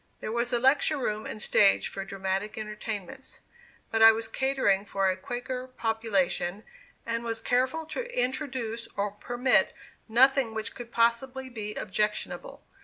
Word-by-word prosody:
There -, -, -4 dB
was 235 Hz, +1 st, 0 dB
a 240 Hz, -, +3 dB
lecture 275 Hz, +4 st, +3 dB
room 215 Hz, -5 st, -2 dB
and -, -, -6 dB
stage 205 Hz, -1 st, +4 dB
for 195 Hz, -, -5 dB
dramatic 195 Hz, +2 st, -3 dB
entertainments; 215 Hz, +3 st, -6 dB, 0.5 s
but 225 Hz, -, +1 dB
I 225 Hz, 0 st, +11 dB
was 225 Hz, 0 st, -3 dB
catering 265 Hz, -8 st, +1 dB
for 195 Hz, -2 st, +1 dB
a -, -, -2 dB
Quaker 250 Hz, +5 st, -5 dB
population, 220 Hz, -5 st, -1 dB, 0.4 s
and 230 Hz, 0 st, -2 dB
was 230 Hz, -1 st, -2 dB
careful 260 Hz, +8 st, 0 dB
to 475 Hz, +11 st, -5 dB
introduce 250 Hz, -3 st, -2 dB
or 200 Hz, 0 st, 0 dB
permit 245 Hz, +5 st, +1 dB, 0.3 s
nothing 250 Hz, 0 st, +4 dB
which 220 Hz, +1 st, -3 dB
could 240 Hz, -1 st, -9 dB
possibly 250 Hz, +3 st, +1 dB
be 210 Hz, -3 st, -6 dB
objectionable. 210 Hz, +2 st, -2 dB
230 Hz, 145 wpm, -28 LUFS, 210-255 Hz, 0.5 s, I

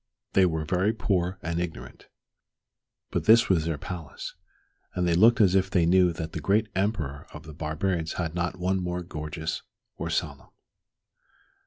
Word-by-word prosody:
They 95 Hz, -1 st, +5 dB
were 80 Hz, -2 st, -2 dB
very 95 Hz, +6 st, +1 dB
poor 95 Hz, -4 st, 0 dB
and 85 Hz, +1 st, -2 dB
ignorant. 80 Hz, -8 st, -6 dB, 1.0 s
But -, -, -1 dB
this 115 Hz, +1 st, +6 dB
was 85 Hz, -5 st, +3 dB
their 80 Hz, -2 st, -1 dB
palace, 85 Hz, -3 st, -7 dB, 0.6 s
and 90 Hz, -1 st, +1 dB
they 85 Hz, -, +3 dB
looked 115 Hz, +8 st, +6 dB
as 95 Hz, -4 st, +5 dB
if 95 Hz, -1 st, +2 dB
they 90 Hz, -3 st, +3 dB
knew 90 Hz, +1 st, +5 dB
that 80 Hz, -1 st, -5 dB
the -, -, -4 dB
great 105 Hz, +6 st, +2 dB
Emperor 90 Hz, -8 st, -2 dB
of 75 Hz, -, -9 dB
the 80 Hz, -1 st, -10 dB
barbarians 80 Hz, +2 st, -2 dB
had 80 Hz, -3 st, -3 dB
not 85 Hz, +1 st, -2 dB
one 95 Hz, +1 st, 0 dB
more 90 Hz, 0 st, -3 dB
gorgeous 80 Hz, -1 st, -4 dB, 0.4 s
or -, -, -3 dB
solemn. -, -, -3 dB
90 Hz, 165 wpm, -27 LUFS, 80-95 Hz, 1.0 s, this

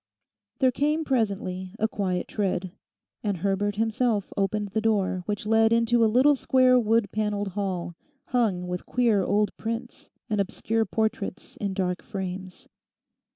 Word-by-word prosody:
There 260 Hz, -2 st, +3 dB
came 300 Hz, +5 st, 0 dB
presently 195 Hz, -7 st, -1 dB
a 220 Hz, -, +1 dB
quiet 185 Hz, -4 st, -2 dB
tread, 185 Hz, -3 st, -2 dB, 0.5 s
and 205 Hz, -3 st, -1 dB
Herbert 200 Hz, +3 st, 0 dB
himself 225 Hz, -1 st, 0 dB
opened 200 Hz, +1 st, 0 dB
the 220 Hz, +3 st, -1 dB
door 200 Hz, -4 st, +1 dB
which 205 Hz, -1 st, -2 dB
led 225 Hz, +1 st, +4 dB
into 230 Hz, 0 st, +3 dB
a -, -, +6 dB
little 260 Hz, +6 st, +5 dB
square 255 Hz, -2 st, +4 dB
wood 225 Hz, -2 st, +2 dB
panelled 210 Hz, -1 st, -1 dB
hall, 180 Hz, -3 st, -3 dB, 0.4 s
hung 210 Hz, -8 st, +1 dB
with 180 Hz, 0 st, -5 dB
queer 235 Hz, -5 st, +2 dB
old 205 Hz, +1 st, +1 dB
prints 230 Hz, +2 st, -5 dB, 0.2 s
and 210 Hz, -3 st, +1 dB
obscure 225 Hz, +3 st, -1 dB
portraits 220 Hz, -4 st, -2 dB
in 200 Hz, -2 st, -3 dB
dark 180 Hz, -2 st, -1 dB
frames. 190 Hz, -2 st, -6 dB
210 Hz, 145 wpm, -26 LUFS, 190-230 Hz, 0.5 s, a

